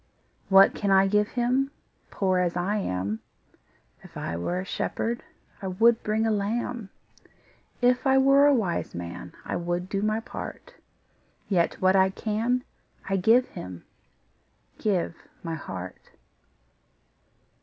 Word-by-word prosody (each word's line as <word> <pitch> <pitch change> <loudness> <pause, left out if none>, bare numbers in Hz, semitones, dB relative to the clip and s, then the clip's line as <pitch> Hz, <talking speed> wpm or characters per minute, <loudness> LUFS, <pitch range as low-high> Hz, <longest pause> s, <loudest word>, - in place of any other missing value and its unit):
What 195 0 +7
can 200 - -2
I 195 0 +6
give 210 +1 +2
Him, 255 +3 0 0.4
Poor 185 -2 +1
as 180 -1 0
I 195 +4 0
am? 100 - -2 0.8
If - - -12
I 85 - -3
were 130 - -2
a 185 - -4
shepherd, 235 +4 -2 0.4
I 195 - -4
would 225 +5 +3
bring 215 +1 0
a 225 - +2
lamb; 220 +1 -2 0.9
If 250 +3 +3
I 265 0 +5
were 275 +2 +6
a 290 - +5
wise 190 -8 -1
man, 85 0 -7
I - - -3
would 175 +1 -3
do 200 0 -1
my 215 +1 +1
part: 225 - -8 0.8
Yet 175 -4 +2
what 185 0 +4
I 190 0 +5
can 225 +5 -1 0.4
I 195 - 0
give 230 +7 +4
Him, 90 -1 -9 0.9
Give 190 -6 0 0.3
my 165 -1 -3
heart. 95 - -7
195 Hz, 135 wpm, -26 LUFS, 180-230 Hz, 0.9 s, What